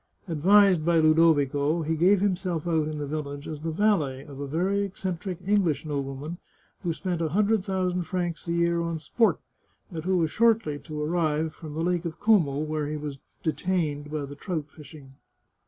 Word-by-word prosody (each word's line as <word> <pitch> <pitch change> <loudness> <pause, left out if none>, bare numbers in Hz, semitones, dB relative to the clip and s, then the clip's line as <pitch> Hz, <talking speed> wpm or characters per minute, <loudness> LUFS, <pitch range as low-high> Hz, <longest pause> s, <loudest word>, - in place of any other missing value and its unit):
Advised 185 +2 +5
by 170 +1 +3
Ludovico, 155 -1 +3
he 160 +1 0
gave 185 +4 +4
himself 180 -4 -1
out 160 -3 +1
in 155 -1 -4
the 145 - -3
village 145 -1 -5
as 155 -2 -6
the 165 - -2
valet 155 -8 +1
of 140 -2 -10
a 140 - -4
very 180 +7 0
eccentric 190 -2 -4
English 180 -8 +1
nobleman 145 +3 -4 0.4
who 175 - -1
spent 175 +1 -3
a 160 - 0
hundred 210 +3 +2
thousand 185 -2 -1
francs 175 -2 -3
a - - -1
year 170 0 +2
on 170 -1 -2
sport, 190 +9 +1 0.5
and 160 -3 -5
who 185 +1 +1
was 160 -3 +1
shortly 225 -10 +2
to 155 -1 -7
arrive 155 0 0
from 155 -2 -9
the 160 - -2
Lake 175 0 0
of 165 -1 -5
Como, 185 -11 +3
where 155 -1 -2
he 150 +1 -3
was 145 -2 -6 0.2
detained 155 -3 -1
by 150 -2 -2
the 140 - -9
trout 160 0 -4
fishing. 145 -3 -13
160 Hz, 185 wpm, -26 LUFS, 150-180 Hz, 0.5 s, Advised